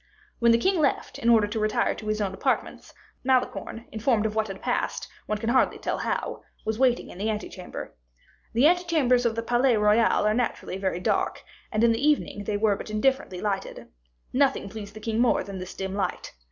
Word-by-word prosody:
When 235 -1 +5
the 230 - +6
king 375 +8 +1
left, 290 -3 0
in 235 - +1
order 225 -3 +6
to 215 +2 -3
retire 215 0 +1
to 215 - -9
his 215 0 0
own 195 -2 -1
apartments, - - -2 0.3
Malicorne, 255 -2 0
informed 220 0 +1
of 215 - -1
what 220 0 0
had 195 -1 -7
passed, - - -2 0.2
one 215 - -1
can 225 +2 -3
hardly 255 +2 +3
tell - - -3
how, - - -2 0.2
was 220 +1 -2
waiting 255 -2 +2
in 180 - -11
the 215 +2 0
ante 215 -1 -2
chamber. 180 -2 -8 0.6
The 240 +5 +4
ante 355 +3 +4
chambers 255 -8 +3
of 225 - -2
the 230 - -2
Palais 240 +1 +3
Royal 210 +1 +3
are 210 - +3
naturally 225 -5 -2
very 190 -2 -1
dark, - - 0 0.3
and, 215 +1 +1
in 235 - +6
the 230 +4 -1
evening, 290 -8 +1
they 205 0 -1
were 210 -1 +2
but - - -8
indifferently 215 -4 0
lighted. 200 -2 -3 0.4
Nothing 270 -6 +2
pleased 210 -1 -8
the - - -7
king 225 +1 -2
more 245 0 +3
than 195 -1 -7
this 185 0 -7
dim 190 0 -4
light. 195 -2 -3
220 Hz, 210 wpm, -26 LUFS, 210-245 Hz, 0.6 s, the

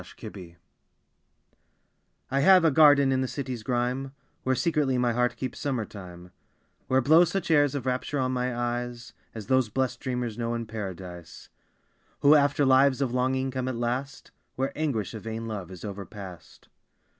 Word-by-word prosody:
My - - -14 0.2
Garden 85 -3 -10 1.8
I 135 - +2
have 180 +3 +6
a 160 - +5
garden 145 -2 +6
in 130 0 +1
the 130 - -1
city's 130 -3 -5
grime 125 +3 -2 0.3
Where 130 0 +1
secretly 150 -5 +1
my 120 -1 +1
heart 125 +1 +1
keeps 130 - -5
summer 130 -6 -2
time; 90 -3 -11 0.6
Where 130 0 +3
blow 160 +6 +6
such 185 0 -2
airs 145 -2 +4
of 135 -3 -4
rapture 130 +3 -2
on 130 -1 0
my 125 -1 -2 0.2
eyes 120 -1 -9 0.2
As 110 -2 -6
those 130 0 +2
blest 130 +3 -1
dreamers 125 -3 -3
know 115 0 -1
in 115 0 -3
Paradise, 95 -6 -8 0.7
Who 145 +1 +7
after 145 -1 +3
lives 130 0 +4
of 130 -3 -1
longing 130 +1 0
come 130 -1 -3
at 130 - -2
last 125 +4 -3 0.2
Where 135 +1 -2
anguish 130 - -2
of 110 - -7
vain 115 0 -5
love 105 -6 -5
is 95 +1 -9
overpast. 100 -2 -9
125 Hz, 170 wpm, -27 LUFS, 110-135 Hz, 1.8 s, Who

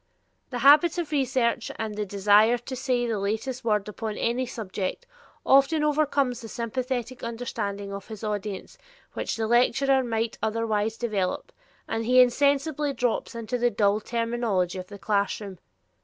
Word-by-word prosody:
The 250 - -4
habit 300 +5 +7
of 335 -3 -3
research 255 -4 0
and 220 -1 -4
the 210 0 -3
desire 205 +4 +4
to 245 +2 -7
say 255 -2 0
the 225 -3 -1
latest 220 +6 -3
word 210 -3 +1
upon 215 0 -5
any 245 +2 0
subject 200 -5 -4 0.4
often 275 +3 +4
overcomes 285 -4 +1
the 225 - -8
sympathetic 245 +2 -3
understanding 210 -4 -4
of 200 0 -7
his 220 -1 -9
audience 210 -2 -4 0.3
which - - -3
the 225 - -1
lecturer 260 +3 +3
might 225 -1 -2
otherwise 220 -1 -1
develop, 205 -6 -2 0.4
and 225 - -2
he 250 +3 +4
insensibly 280 +3 +3
drops 245 -2 -1
into 230 +2 -3
the 240 0 +3
dull 205 -2 +2
terminology 230 -6 -1
of 180 - -8
the 205 - -10
classroom. 200 -2 -2
230 Hz, 150 wpm, -26 LUFS, 210-255 Hz, 0.4 s, habit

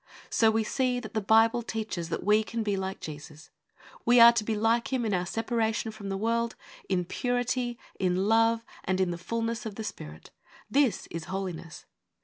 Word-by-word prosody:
So 225 - +4
we 220 0 +1
see 250 +2 0
that 245 - -9
the 220 - 0
Bible 225 +3 +4
teaches 220 -7 -4
that 165 - -3
we 210 +1 +4
can 230 +1 -3
be 205 -2 0
like 190 0 -4
Jesus. 150 +1 -9 0.5
We 240 0 +5
are 235 0 +10
to 235 -2 0
be 220 +1 -1
like 225 +4 +1
Him 255 -3 0
in 210 - 0
our 180 -1 0
separation 225 +1 -1
from 210 -2 -8
the 195 - -2
world, 230 +2 0 0.3
in 180 -2 +1
purity, 245 +2 -1 0.2
in 185 +1 +1
love, 225 +1 +3 0.2
and 185 0 0
in 185 -2 +1
the 170 - -5
fullness 230 +4 -2
of 215 -3 -6
the 220 - -5
Spirit. 75 - -8 0.4
This 270 -6 +2
is 165 -1 -5
Holiness. 185 -4 -6
220 Hz, 190 wpm, -28 LUFS, 190-230 Hz, 0.5 s, are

